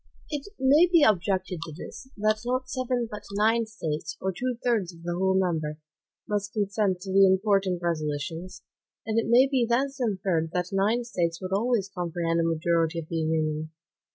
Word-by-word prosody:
It 295 +4 -4
may 285 +6 +6
be 335 -4 +6
objected 190 - +1
to 160 - -8
this, 260 +7 -9
that 215 +1 +1
not 255 +1 -1
seven 255 -2 -1
but 210 - -6
nine 220 +3 +2
States, 160 -7 -4
or 190 - -1
two 250 +3 -2
thirds 220 -8 +1
of 165 - -16
the 175 0 -2
whole 190 +2 +2
number, 160 -5 -1 0.5
must 205 0 -2
consent 200 -3 0
to 190 0 -6
the 195 0 +6
most - - +6
important 190 -2 +1
resolutions; 165 +2 -3 0.4
and 220 +1 +1
it - - -2
may 250 +3 +6
be 265 -3 +1
thence 270 +4 0
inferred 190 -7 0
that 180 0 -1
nine 210 +5 +2
States 170 -8 -2
would 185 0 -4
always 220 -1 +1
comprehend 170 -1 -1
a - - +2
majority 165 0 +1
of 160 -2 -5
the 165 - -2
Union. 155 -1 -1
190 Hz, 180 wpm, -27 LUFS, 170-230 Hz, 0.5 s, may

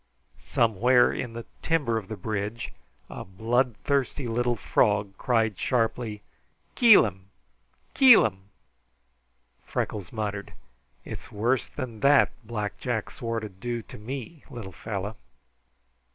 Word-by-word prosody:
Somewhere 120 +3 +3
in 120 -2 -4
the 115 0 -7 0.2
timber 150 -8 +1
of 100 - -12
the 110 - -6
bridge 105 +3 -4 0.3
a - - -7
bloodthirsty 125 +6 0
little 120 +1 0
frog 100 -1 +1
cried 110 -6 0
sharply. 115 -3 -1 0.5
"KEEL'IM! 105 - +5 0.6
KEEL'IM!" 100 - +6 1.1
Freckles 100 -5 -3
muttered: 105 -2 -4 0.5
"It's 110 - -8
worse 115 +4 0
than 125 -6 -7
that 140 +3 +5
Black 105 -2 -4
Jack 120 -4 -2
swore 115 -1 -3
to 110 - -6
do 115 +5 -5
to - - -12
me, 135 +6 -7
little 110 -6 -8
fellow." 105 +3 -5
115 Hz, 110 wpm, -26 LUFS, 105-125 Hz, 1.1 s, KEEL'IM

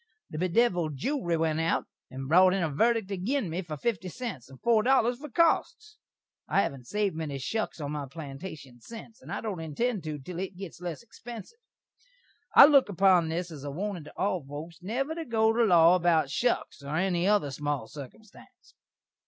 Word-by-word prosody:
The 155 - -5
bedevild 180 -4 +1
jewry 175 - -1
went 160 -1 0
out, 165 +1 0 0.2
and 135 +1 -7
brot 185 +4 +5
in 190 - 0
a 160 - -1
verdik 225 +5 +1
agin 200 - -1
me 175 +3 -2
for 160 -4 -7
fifty 195 +1 -2
cents, 175 - -6
and 135 -1 -14
four 230 -2 +3
dollars 245 0 +2
for 300 +1 -8
costs. 425 - +1 0.5
I 195 - +3
hain't 130 -7 -5
saved 205 -1 -1
many 155 -4 -4
shuks 215 - -3
on 145 -1 -4
my 145 -2 -4
plantashun 140 -3 -9
sence, 230 - -11
and - - -11
I - - -3
don't 210 -6 -4
intend 180 +6 -2
to 155 -1 -4
til 170 +5 -8
it 190 -1 -5
gits 190 -2 -9
less 175 +5 -6
xpensiv! 235 - -10 1.0
I - - +12
look 280 -6 +5
upon 185 -3 +4
this 170 +2 -3
as 145 -4 -9
a 145 - -4
warnin' 180 +2 -4
to 150 - -14
all 185 -4 0
foaks 150 +5 -9
never 255 - -2
to 330 0 -5
go 225 -5 +2
to 235 +1 +3
law 170 -3 +6
about 170 -5 +2
shuks, 245 -10 -1
or 140 +2 -4
any 180 +1 +1
other 205 -9 +2
small 145 -4 -3
sirkumstanse. 145 - -13
180 Hz, 190 wpm, -28 LUFS, 155-225 Hz, 1.0 s, I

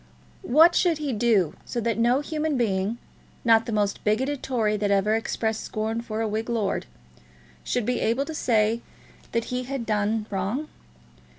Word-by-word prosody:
What 320 +7 +6
should 345 -3 +2
he 295 -3 -2
do, 210 -8 +2
so 240 - -4
that 230 0 -1
no 245 +4 +3
human 305 -1 -1
being, 205 -1 0 0.5
not 225 -1 +5
the - - -2
most 205 -2 0
bigoted 260 +7 0
Tory 225 -5 0
that 205 -1 0
ever 200 +2 +3
expressed 220 0 -1
scorn 220 +2 -2
for 220 -1 -4
a 225 - 0
Whig 220 +2 -3
lord, 225 -4 -1 0.8
should 245 -3 -1
be 250 +1 0
able 235 +5 +1
to 320 - -6
say 225 -4 +1 0.5
that 230 0 0
he 250 0 -2
had 265 -2 -4
done 215 0 0
wrong? 205 +10 -2
225 Hz, 170 wpm, -25 LUFS, 215-250 Hz, 0.8 s, What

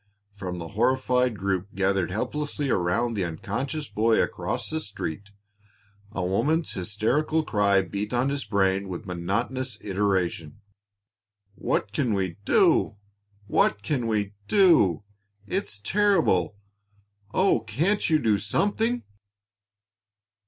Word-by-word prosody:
From 95 -3 -5
the 85 -1 -6
horrified 125 +1 +1
group 95 0 -2
gathered 95 -1 +1
helplessly 145 +7 -2
around 95 +7 +1
the 100 -4 -1
unconscious 130 - -3
boy 110 +2 +2
across 120 +1 -1
the 160 - -2
street, 100 - -5 0.8
a 90 - -2
woman's 155 - +1
hysterical 115 - 0
cry 100 -6 +2
beat 100 +3 -4
on 125 +2 +1
his 140 0 -2
brain 100 -1 +1
with 90 - -6
monotonous 105 +8 -2
iteration: 95 -6 -1 0.9
"What 105 0 -1
can 115 -2 +1
we 95 -4 -2
do? - - +3 0.5
What 100 0 +2
can 125 0 -1
we 105 -2 -1
do? 165 - +4 0.4
It's 145 - -3
terrible! 165 - +2 0.8
Oh, 190 +8 +3
can't 165 - 0
you 155 - +5
do 110 -8 +2
something?" 220 - 0
105 Hz, 115 wpm, -26 LUFS, 95-140 Hz, 0.9 s, you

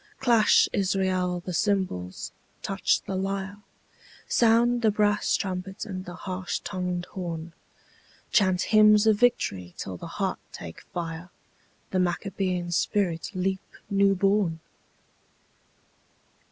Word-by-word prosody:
Clash, 235 -4 +5
Israel, 185 -2 0
the 180 - -4
cymbals, 175 - -1 0.3
touch - - +1
the - - -5
lyre, 195 +1 -3 0.7
Sound 235 +1 +3
the 220 - +4
brass 205 0 +2
trumpet 190 0 -4
and 185 -3 -6
the 175 - -8
harsh 185 -1 -4
tongued 180 -2 -3
horn, 170 -3 -5 0.8
Chant 185 -3 +3
hymns 215 0 +6
of 215 -2 +4
victory 95 - +1
till 95 -2 -5
the - - -8
heart - - -1
take 80 -1 -9
fire, 170 0 -6 0.6
The 185 - +1
Maccabean 180 0 -1
spirit 175 -1 0
leap 190 +1 -1 0.3
new 200 0 +4
born! 195 -3 +1
190 Hz, 115 wpm, -26 LUFS, 175-205 Hz, 0.8 s, hymns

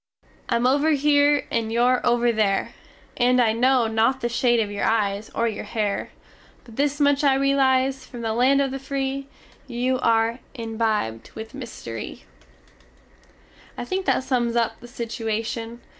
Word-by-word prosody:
_Im 235 +1 +2
over 285 +4 +3
here, 290 0 +3
and 225 -1 -1
your 245 +2 +2
"over 240 0 +3
there" 210 -3 0 0.4
And 250 0 +3
I 225 -3 +3
no 250 +1 +3
not 225 +4 +1
the 240 - -1
shade 240 0 +2
of 210 -2 -1
your 205 - -3
eyes 210 -1 0
or 235 - +1
your 215 -2 -4
hare. 210 -3 -2 0.5
But 230 - -14
this 285 +2 0
much 285 0 +3
I 275 -2 +4
relize, 270 -1 +2
from 245 -2 -9
the 225 -1 -1
land 260 +4 +3
of 270 - -2
the 270 - -4
Free! 270 0 -3 0.4
You 250 +2 -1
are 230 0 +2 0.2
imbibed 220 - -2
with 220 +3 -8
mystery_! 225 - -7 1.6
I - - -4
think 375 +7 -3
that - - +2
sums 245 -3 0
up 235 -2 0
the 240 - -12
situation. 230 0 -4
240 Hz, 160 wpm, -23 LUFS, 225-270 Hz, 1.6 s, I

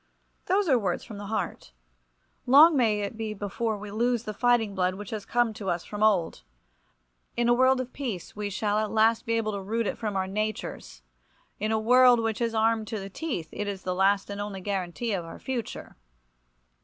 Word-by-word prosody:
Those 390 +1 +2
are 260 -5 +4
words 185 -5 -2
from 210 -3 -9
the 205 - -7
heart. 215 - -4 0.7
Long 300 +6 +8
may 220 -5 +2
it 200 +2 -4
be 220 -1 -4
before 210 +2 -2
we 205 0 -8
lose 235 +2 0
the 215 - -5
fighting 235 -2 +2
blood 185 -1 0
which 205 0 -8
has 215 -3 -5
come 240 -2 +1
to 200 -2 -5
us 170 0 -2
from 210 0 -7
of 215 - +7
old! 180 -6 -2 1.0
In 240 0 +2
a 240 - +5
world 260 +1 +4
of 255 -1 -5
peace 235 - -5
we 205 -1 -3
shall 205 +1 0
at 215 -1 -1
last 225 +1 +2
be 230 - +1
able 225 -1 0
to 200 -1 -4
root 225 +4 -1
it - - -3
from 210 -3 -3
our 190 0 0
natures. 195 - -4 0.6
In 215 +2 -1
a 220 - +2
world 245 +2 +6
which 225 0 -2
is 230 -1 0
armed 220 0 +2
to 220 - -4
the 195 0 -8
teeth 250 - -4
it 205 - -4
is 195 -2 -5
the 185 - -1
last 195 +2 +2
and 200 0 -4
only 205 -2 -5
guarantee 195 +3 -3
of 180 -3 -2
our 165 - -9
future. 255 -3 -5
215 Hz, 215 wpm, -27 LUFS, 200-235 Hz, 1.0 s, Long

